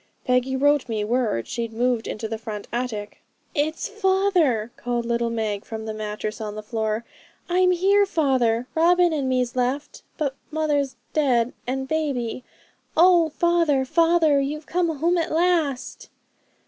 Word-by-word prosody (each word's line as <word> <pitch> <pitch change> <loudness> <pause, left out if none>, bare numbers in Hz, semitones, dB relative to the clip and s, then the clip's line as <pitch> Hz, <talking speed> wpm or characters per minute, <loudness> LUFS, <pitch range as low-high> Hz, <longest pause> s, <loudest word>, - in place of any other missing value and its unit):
Peggy 255 +1 +1
wrote 290 -1 +2
me 215 -2 -1
word 220 - 0
she'd 230 -1 -3
moved 240 0 0
into 220 +1 -4
the 220 0 -5
front 215 -2 -6
attic.' 230 -4 -4 0.3
'It's 310 +1 -1
father,' 380 - +1
called 240 -1 -2
little 235 0 0
Meg 215 -3 -2
from 220 -1 -7
her 220 - -4
mattress 215 0 -5
on 210 -1 -5
the 215 - -6
floor; 220 0 -2 0.4
'I'm 365 +1 +3
here, 395 +3 +3
father! 255 -8 +1
Robin 350 +1 +4
and 280 -4 -1
me's 250 -1 0
left; 260 +4 -2 0.2
but 285 -4 -1 0.2
mother's 295 -4 0 0.2
dead, 250 -6 +2
and 265 +1 -2
baby. 265 -6 -2 0.5
Oh! 345 -1 +6
father, 330 -4 +2
father! 330 -1 +3
You've 300 +3 -3
come 350 -1 0
home 340 +4 +2
at 330 - -2
last!' 325 -6 0
265 Hz, 150 wpm, -23 LUFS, 230-325 Hz, 0.5 s, Oh